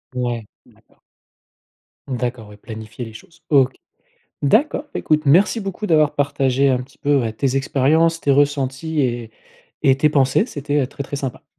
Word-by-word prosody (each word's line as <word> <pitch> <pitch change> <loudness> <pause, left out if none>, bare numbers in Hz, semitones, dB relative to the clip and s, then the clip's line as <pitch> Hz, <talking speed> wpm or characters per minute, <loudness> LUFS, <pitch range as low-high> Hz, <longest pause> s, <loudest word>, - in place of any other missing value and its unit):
Ouais, 120 -3 -2 0.2
d'accord. - - -27 1.1
D'accord, 120 -4 -4
ouais, 105 - -13
planifier 110 +2 -8
les 110 - -11
choses. 165 +9 -15
OK. 135 -3 +4 0.7
D'accord. 275 - +2
Beh, - - -3
écoute, 155 -1 +1
merci 195 +10 +4
beaucoup 195 +2 -4
d'avoir 155 -4 +3
partagé 140 -1 +1
un 125 -1 +1
petit 135 +2 -18
peu, 140 -4 +2
heu, 110 - -2
tes 135 +3 -1
expériences, 155 +5 +2
tes 140 - 0
ressentis 145 +2 0
et 120 -4 -2 0.5
et 135 - +5
tes 150 +2 +3
pensées, 140 - +2
c'était, 145 - -2
heu, - - -1
très, 140 +1 -7
très 145 - -5
sympa. 135 -3 -5
140 Hz, 165 wpm, -20 LUFS, 125-150 Hz, 1.1 s, et